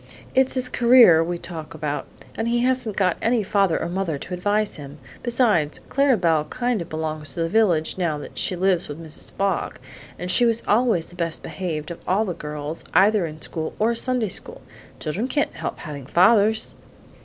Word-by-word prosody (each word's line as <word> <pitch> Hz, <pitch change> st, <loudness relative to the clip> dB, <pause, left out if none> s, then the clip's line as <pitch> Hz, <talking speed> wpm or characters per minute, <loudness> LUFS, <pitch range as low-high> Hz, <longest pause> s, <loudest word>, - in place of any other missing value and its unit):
It's 265 Hz, 0 st, +2 dB
his 255 Hz, -1 st, +2 dB
career 235 Hz, -10 st, +6 dB
we 175 Hz, +1 st, -3 dB
talk 165 Hz, -3 st, -7 dB
about, 150 Hz, -1 st, -3 dB, 0.3 s
and 225 Hz, -, -3 dB
he 240 Hz, 0 st, +1 dB
hasn't 250 Hz, -4 st, 0 dB
got 185 Hz, -3 st, +1 dB
any 230 Hz, -1 st, +2 dB
father 195 Hz, -4 st, +1 dB
or -, -, -2 dB
mother 175 Hz, -3 st, -2 dB
to 180 Hz, -, -8 dB
advise 205 Hz, +3 st, 0 dB
him. 145 Hz, 0 st, -10 dB, 0.2 s
Besides, 230 Hz, -, +1 dB
Clara 275 Hz, -3 st, +3 dB
Belle 165 Hz, -4 st, +2 dB
kind 245 Hz, +4 st, -1 dB
of 170 Hz, -, -7 dB
belongs 155 Hz, -1 st, -4 dB
to 170 Hz, -, -2 dB
the 165 Hz, -, -1 dB
village 180 Hz, -6 st, +2 dB
now 165 Hz, -4 st, 0 dB
that 145 Hz, -, -8 dB
she 185 Hz, -, 0 dB
lives 185 Hz, -1 st, +2 dB
with 145 Hz, +2 st, -6 dB
Mrs. 160 Hz, -2 st, -9 dB
Fogg; 195 Hz, 0 st, -1 dB, 0.4 s
and 180 Hz, +1 st, -2 dB
she 245 Hz, -, +4 dB
was 230 Hz, -1 st, +2 dB
always 220 Hz, -6 st, +2 dB
the 175 Hz, -, -16 dB
best 170 Hz, -2 st, -2 dB
behaved 165 Hz, -4 st, -4 dB
of 170 Hz, -, -7 dB
all 200 Hz, +4 st, +2 dB
the 180 Hz, -, -3 dB
girls, 150 Hz, 0 st, -6 dB
either 200 Hz, -1 st, +4 dB
in 155 Hz, 0 st, -10 dB
school 160 Hz, -1 st, -5 dB
or 225 Hz, +2 st, +2 dB
Sunday 240 Hz, -2 st, 0 dB
school. 475 Hz, -, -6 dB, 0.4 s
Children 180 Hz, +10 st, -2 dB
can't 290 Hz, +2 st, 0 dB
help -, -, -5 dB
having 145 Hz, -5 st, -8 dB
fathers!" 215 Hz, +6 st, +4 dB
185 Hz, 190 wpm, -23 LUFS, 160-230 Hz, 0.4 s, career